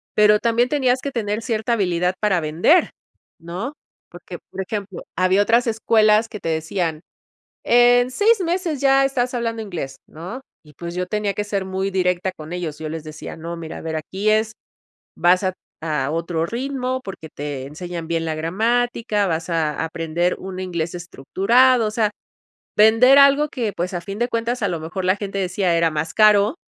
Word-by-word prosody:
Pero 210 0 +5
también 235 +2 +2
tenías 260 -3 +2
que 280 - -4
tener 215 -2 -2
cierta 225 0 -1
habilidad 180 -3 0
para 195 -5 +1
vender, 170 - +3 0.5
¿no? 185 - -5 0.4
Porque, 175 0 -10
por 190 - -4
ejemplo, 200 -1 -5
había 185 +2 +3
otras 235 +4 +3
escuelas 220 -1 +3
que 215 -2 -8
te 165 - -3
decían: 160 0 -2 0.6
"En 245 +1 +5
seis 425 - +3
meses 345 -4 -1
ya 270 0 +4
estás 255 -2 -1
hablando 230 -1 -2
inglés", 160 -9 -6
¿no? 180 +11 -8 0.2
Y 150 - -17
pues 170 0 -7
yo 180 0 -2
tenía 210 -1 -1
que 210 - -2
ser 200 -2 -2
muy 190 +1 -2
directa 185 0 0
con 155 -2 -10
ellos. 165 -4 -4
Yo 155 0 -5
les 160 0 -6
decía: 155 -1 -8
"No, 165 +1 -6
mira, 160 -1 -7
a - - -9
ver, 160 -1 -3
aquí 190 +7 -1
es, 220 0 +2 0.6
vas 180 +2 +3
a 185 - 0 0.3
a 150 -3 -1
otro 165 0 -1
ritmo 255 +3 -3
porque 185 -5 -8
te 145 -2 -5
enseñan 165 +3 -7
bien 165 -1 -1
la 160 -1 -2
gramática, 220 +4 0
vas 165 0 -2
a 160 -3 0
a 160 - 0
aprender 165 +2 -1
un 185 -1 -7
inglés 170 -3 -3
estructurado". 215 - +2
O - - -3
sea, 215 -1 +1 0.7
vender 225 +6 +7
algo 280 +2 +5
que 230 -7 -2
pues, 180 +2 -3
a 175 - -3
fin 195 +3 -7
de 240 - 0
cuentas, 230 +1 -2
a - - +2
lo 170 - -3
mejor 180 +4 -5
la 185 +2 +2
gente 200 -1 -5
decía 185 -1 0
era 165 -1 +2
más 155 +1 -3
caro, 215 +4 +5
195 Hz, 185 wpm, -21 LUFS, 170-230 Hz, 0.7 s, vender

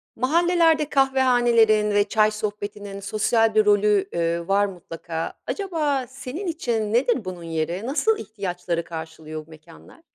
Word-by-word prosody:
Mahallelerde 325 +3 +2
kahvehanelerin 240 -6 +3
ve 205 0 +3
çay 215 +1 +2
sohbetinin 205 -1 -5
sosyal 215 +2 +1
bir 215 -1 +5
rolü, 205 -1 +3
eee, 170 0 -1
var 200 +1 +3
mutlaka. 170 -3 -6
Acaba 305 -10 -1
senin 275 - -7
için 230 -10 -2
nedir 240 -3 +2
bunun 180 -2 -6
yeri? 165 +2 -3
Nasıl 375 - +1
ihtiyaçları 180 - -4
karşılıyor 160 -1 -8
bu - - -25
mekânlar? 155 - -16
210 Hz, 130 wpm, -23 LUFS, 175-260 Hz, -, bir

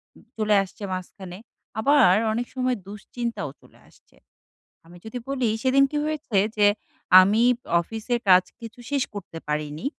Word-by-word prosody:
উম - - -19
চলে 210 -1 +2
আসছে 195 +2 -12
মাঝখানে। 185 0 -8 0.4
আবার 275 -6 +5 0.2
অনেক 240 +2 -3
সময় 255 -1 0
দুশ্চিন্তাও 210 - -5
চলে - - -22
আসছে। - - -26 0.7
আমি 175 +1 -15
যদি 220 +3 -6
বলি, 255 -5 0
সেদিন 270 +1 +4
কি 295 - -2
হয়েছে? 300 -9 -2 0.2
যে 205 -1 +5 0.5
আমি 210 +5 +2 0.4
অফিসের 225 +5 -3
কাজ 185 0 +7 0.2
কিছু 230 +1 -11
শেষ 280 -2 +1
করতে 185 -5 -8
পারিনি, 150 - -4
220 Hz, 145 wpm, -24 LUFS, 185-250 Hz, 0.7 s, কাজ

